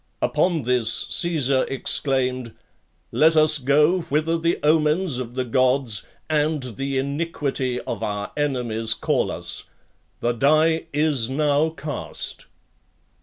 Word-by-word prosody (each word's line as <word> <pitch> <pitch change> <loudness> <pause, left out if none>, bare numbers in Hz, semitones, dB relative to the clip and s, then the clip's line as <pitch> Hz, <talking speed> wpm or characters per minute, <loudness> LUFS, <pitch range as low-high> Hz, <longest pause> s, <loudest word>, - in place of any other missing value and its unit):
Upon 170 -5 +1
this, 120 -2 0
Caesar 140 -6 +1
exclaimed, 130 -3 0 0.6
"Let 160 +1 +4
us 155 -1 +5
go 150 +7 +3
whither 155 +3 +1
the 165 +1 0
omens 155 -1 +2
of 120 -1 -6
the 130 -1 -1
Gods 130 -3 +1 0.3
and 155 -2 0
the 135 0 -2
iniquity 140 -3 -2
of 115 -3 -5
our 105 -2 -3
enemies 120 -6 -1
call - - 0
us. - - -6 0.5
The 120 - 0
die 155 +6 +2
is 145 -5 +1
now 145 +2 +2
cast." 155 -3 -5
140 Hz, 120 wpm, -23 LUFS, 125-155 Hz, 0.6 s, us